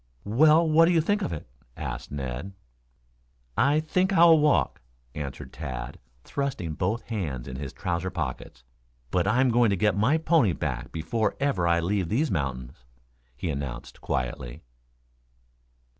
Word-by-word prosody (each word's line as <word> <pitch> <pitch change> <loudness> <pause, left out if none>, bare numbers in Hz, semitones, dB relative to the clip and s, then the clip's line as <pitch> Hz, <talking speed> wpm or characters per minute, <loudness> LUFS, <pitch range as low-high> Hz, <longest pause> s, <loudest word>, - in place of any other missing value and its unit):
"Well, 155 +10 +5
what 160 +1 +6
do 170 - +3
you 165 - +4
think 205 +6 +1
of - - -2
it?" 80 - -6 0.3
asked - - -5
Ned. 70 +6 -5 1.0
"I 145 +3 +3
think 185 +5 +1
I'll 170 -3 +7
walk," 120 - +2 0.3
answered 70 -3 -6
Tad, - - -6 0.2
thrusting 135 - -3
both 100 +8 -1
hands 80 - -3
in 65 - -6
his 70 -1 -5
trousers 90 +5 -3
pockets. 65 -6 -5 0.5
"But 90 0 +1
I'm 125 +6 +3
going 120 -1 +4
to 100 - +2
get 105 0 +2
my 115 +10 +3
pony 160 - +3
back 65 -7 -4
before 95 +8 -1
ever 120 -12 +1
I 85 0 +3
leave 95 0 -1
these 140 +8 +1
mountains," 65 -4 -3 0.5
he 80 +5 -2
announced 70 -4 -6
quietly. - - -3
95 Hz, 145 wpm, -26 LUFS, -, 1.0 s, I'll